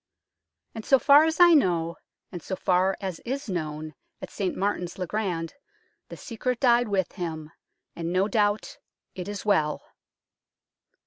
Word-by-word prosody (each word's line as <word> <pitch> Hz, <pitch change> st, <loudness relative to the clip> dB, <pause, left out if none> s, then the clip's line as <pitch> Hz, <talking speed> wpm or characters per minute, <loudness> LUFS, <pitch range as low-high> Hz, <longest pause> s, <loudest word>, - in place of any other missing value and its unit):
And 225 Hz, -, -7 dB
so 270 Hz, -, +5 dB
far 285 Hz, +3 st, +6 dB
as 320 Hz, +1 st, -1 dB
I 350 Hz, -1 st, +8 dB
know, 170 Hz, -, +2 dB, 0.4 s
and 175 Hz, -, -7 dB
so 190 Hz, -, -4 dB
far 185 Hz, +1 st, +1 dB
as 185 Hz, -4 st, -4 dB
is 275 Hz, +3 st, -5 dB
known 155 Hz, -4 st, -4 dB, 0.3 s
at -, -, -9 dB
St 195 Hz, -3 st, -3 dB
Martin's 190 Hz, -3 st, -2 dB
le 185 Hz, -, -3 dB
Grand, 175 Hz, -4 st, -3 dB, 0.6 s
the -, -, -9 dB
secret 250 Hz, 0 st, -3 dB
died 245 Hz, -2 st, +4 dB
with 195 Hz, -3 st, -1 dB
him, 160 Hz, -4 st, -6 dB, 0.4 s
and 170 Hz, 0 st, -4 dB
no 185 Hz, +2 st, +2 dB
doubt 205 Hz, 0 st, 0 dB, 0.3 s
it 180 Hz, 0 st, -7 dB
is 205 Hz, 0 st, -6 dB
well. 155 Hz, -7 st, +1 dB
190 Hz, 150 wpm, -26 LUFS, 170-225 Hz, 0.6 s, I